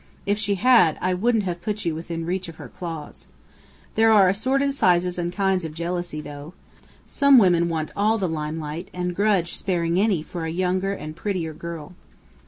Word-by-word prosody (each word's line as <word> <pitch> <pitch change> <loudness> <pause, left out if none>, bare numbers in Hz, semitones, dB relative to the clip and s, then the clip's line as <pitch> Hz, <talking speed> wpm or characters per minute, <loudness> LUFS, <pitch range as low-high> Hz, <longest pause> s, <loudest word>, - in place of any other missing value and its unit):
If 205 +1 0
she 205 -1 0
had, 230 -7 +4
I 185 0 0
wouldn't 220 +4 +1
have 175 -2 -4
put 210 0 -3
you 165 - 0
within 165 +1 -5
reach 180 +2 -2
of 165 - -10
her - - -10
claws. 165 -4 -8 0.7
There 225 0 +4
are 200 -4 +6
assorted 270 +8 +1
sizes 180 -7 +2
and 175 0 -2
kinds 190 -1 0
of 155 -1 -6
jealousy, 170 -2 -3
though. 145 +3 -9 0.5
Some 280 -1 +5
women 175 -5 +4
want 160 -2 -2
all 215 +2 +2
the 195 -4 -1
lime 155 -1 -3
light 155 +3 -6
and 180 0 -2
grudge 200 -4 +1
sparing 175 -2 0
any 195 -6 +2
for 170 +1 -6
a - - -2
younger 185 +3 0
and 155 -5 -7
prettier 165 -3 -3
girl." 170 +1 -8
180 Hz, 190 wpm, -23 LUFS, 165-200 Hz, 0.7 s, are